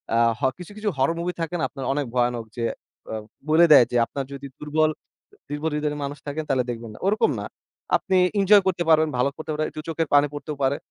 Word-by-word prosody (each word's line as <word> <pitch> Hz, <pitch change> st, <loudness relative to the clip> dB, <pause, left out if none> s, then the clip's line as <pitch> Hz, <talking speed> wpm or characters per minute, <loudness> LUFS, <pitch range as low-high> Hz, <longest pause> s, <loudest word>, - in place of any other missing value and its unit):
আ -, -, +3 dB, 0.2 s
হ -, -, -21 dB, 0.2 s
কিছু, 180 Hz, +2 st, -10 dB
কিছু 215 Hz, 0 st, -1 dB
হরর 135 Hz, +5 st, +2 dB
মুভি 175 Hz, +1 st, -2 dB
থাকে 165 Hz, +2 st, -3 dB
না -, -, -1 dB
আপনার 135 Hz, -3 st, -7 dB
অনেক 145 Hz, 0 st, -1 dB
ভয়ানক, 120 Hz, -2 st, +1 dB
যে 120 Hz, -, -2 dB, 0.5 s
অ -, -, -4 dB, 0.4 s
বলে 160 Hz, +2 st, +6 dB
দেয় 140 Hz, -5 st, +9 dB
যে -, -, -3 dB
আপনার 135 Hz, +3 st, -5 dB
যদি 140 Hz, 0 st, -7 dB
দুর্বল 155 Hz, +1 st, +1 dB, 0.6 s
দুর্বল 145 Hz, +2 st, -2 dB
হৃদয়ের 150 Hz, 0 st, -1 dB
মানুষ 140 Hz, +1 st, -4 dB
থাকেন 150 Hz, +2 st, -3 dB
তাহলে 130 Hz, -2 st, +2 dB
দেখবেন 115 Hz, -2 st, -5 dB
না। -, -, -12 dB
ওরকম 210 Hz, +2 st, +3 dB
না। -, -, -5 dB, 0.5 s
আপনি 190 Hz, -2 st, 0 dB, 0.2 s
ইনজয় 200 Hz, +1 st, +6 dB
করতে 175 Hz, -2 st, +1 dB
পারবেন 155 Hz, -1 st, +5 dB
ভালো 125 Hz, +3 st, +2 dB
করতে 155 Hz, -, -5 dB
পারে 155 Hz, +1 st, -1 dB
দু -, -, -5 dB
চোখের 165 Hz, 0 st, -1 dB
পানি 145 Hz, 0 st, +6 dB
পড়তেও 150 Hz, +1 st, -5 dB
পারে। 135 Hz, +2 st, +2 dB
150 Hz, 220 wpm, -24 LUFS, 135-165 Hz, 0.6 s, দেয়